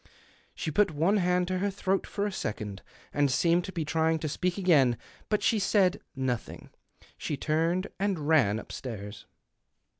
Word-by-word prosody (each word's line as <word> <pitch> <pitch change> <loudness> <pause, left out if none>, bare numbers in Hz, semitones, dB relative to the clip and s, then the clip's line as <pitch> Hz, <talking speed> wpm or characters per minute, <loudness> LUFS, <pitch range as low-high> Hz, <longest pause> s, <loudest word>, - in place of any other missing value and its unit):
She 155 - -3
put 205 +5 +3
one 165 +7 +2
hand 180 -1 +2
to 185 0 0
her 200 +2 +1
throat 195 0 -1
for 205 - -2
a 205 - -1
second, 105 - -4 0.3
and 145 -1 +2
seemed 170 +6 +2
to 190 - -7
he 165 -3 -1
trying 160 +1 +1
to 155 - -3
speak 180 +5 -1
again. 145 - +4 0.3
But 210 - +1
she 220 - +3
said 195 -2 +2
nothing; 130 -3 -3 0.5
she 150 - -3
turned 165 +5 +1
and 190 -7 -1
ran 125 -10 +4
upstairs. 105 -4 -7
165 Hz, 160 wpm, -29 LUFS, 140-185 Hz, 0.5 s, again